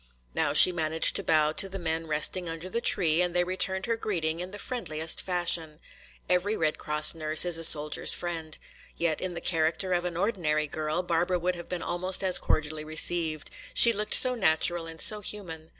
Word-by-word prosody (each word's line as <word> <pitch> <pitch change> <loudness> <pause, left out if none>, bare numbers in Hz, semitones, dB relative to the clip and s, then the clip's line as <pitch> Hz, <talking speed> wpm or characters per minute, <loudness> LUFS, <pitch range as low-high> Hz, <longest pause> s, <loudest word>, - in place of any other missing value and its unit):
Now - - -1
she 185 - +7
managed 160 -2 +2
to 200 - -3
bow 155 -3 +2
to 195 +5 +7
the 195 - -6
men 165 -2 -3
resting 160 +3 0
under 165 +2 -7
the 235 +5 -3
tree 170 -7 +1
and 180 -1 -2
they 175 - +2
returned 190 +1 -1
her 230 - -1
greeting 170 -8 -3
in 180 +1 -6
the 205 - -9
friendliest 165 -10 -4
fashion. 170 -4 -2 0.5
Every 180 +4 0
Red 155 -1 0
Cross 150 0 0
nurse 155 0 +1
is 175 -2 +1
a - - -4
soldier's 150 -2 +3
friend. 165 -3 -5 0.4
Yet 165 -2 -1
in 185 -2 -5
the - - -6
character 165 +2 -1
of 175 0 -1
an 175 -1 -4
ordinary 170 -7 -1
girl 155 +3 -4
Barbara 175 +1 -1
would 180 +1 -2
have 170 -1 -10
been 180 -2 -5
almost 185 +2 -2
as 185 -1 +4
cordially 155 0 -2
received. 155 0 -1 0.2
She 235 - +6
looked 210 0 0
so 255 -1 +5
natural 170 -5 +1
and 165 0 -10
so 210 -1 +2
human. 165 -7 -7
170 Hz, 200 wpm, -27 LUFS, 155-185 Hz, 0.5 s, she